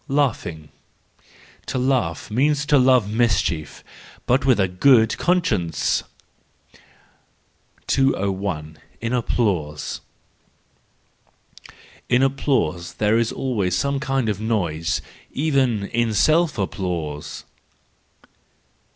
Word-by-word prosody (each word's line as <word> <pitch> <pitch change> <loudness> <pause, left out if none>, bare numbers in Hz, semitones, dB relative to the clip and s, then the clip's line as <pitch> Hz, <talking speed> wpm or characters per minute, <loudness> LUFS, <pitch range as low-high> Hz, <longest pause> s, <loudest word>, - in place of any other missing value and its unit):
Laughing 110 - -1 1.0
,—To - - -2
laugh 125 - 0
means 145 +5 +1
to 145 -1 +4
love 130 -3 +4
mischie 100 -9 0 0.4
but 130 +2 +2
with 125 -5 +4
a 95 - +3
good 110 +4 +4
conscience. 105 - +1 1.8
201. 95 - -1 0.2
In 115 +2 -3
Applause. 90 -11 -1 2.1
—In 125 +1 +4
applause 130 - 0
there 110 +2 +2
is 115 -1 0
always 105 -9 -1
som< 140 0 0
kind 135 -3 -1
of 105 -1 -2
noise: 85 -8 -1 0.3
even 135 -8 +1
in 120 -2 0
self 155 +6 +3
applause. 90 -7 -4
115 Hz, 90 wpm, -22 LUFS, 90-135 Hz, 2.1 s, to